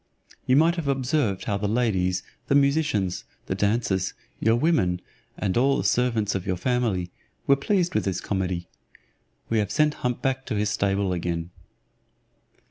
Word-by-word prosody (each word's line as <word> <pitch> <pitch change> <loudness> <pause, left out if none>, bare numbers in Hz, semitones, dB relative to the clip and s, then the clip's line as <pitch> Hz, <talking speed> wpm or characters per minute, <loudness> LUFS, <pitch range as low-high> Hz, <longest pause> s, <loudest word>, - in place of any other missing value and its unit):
You 130 - +4
might 165 +4 +4
have 165 -4 -3
observed 135 - 0
how 100 -3 -1
the 105 +1 -1
ladies, 95 -5 +1 0.2
the 140 - +2
musicians, 140 - +2 0.2
the - - -2
dancers, 100 -1 0 0.2
your 115 +1 +3
women, 120 - +2 0.4
and 95 -3 -1
all 135 +3 +3
the - - -1
servants 115 -5 +1
of 95 -2 -3
your 90 - 0
family, 110 -6 0 0.3
were 140 - +5
pleased 180 +5 0
with - - 0
this 95 -2 -1
comedy. 90 -3 -2 0.8
We 115 - +2
have 105 -1 0
sent 150 +6 +2
hump 125 0 -2
back 135 0 -1
to - - -2
his 105 0 0
stable 100 -1 0
again." 85 -1 -3
110 Hz, 160 wpm, -25 LUFS, 95-135 Hz, 0.8 s, were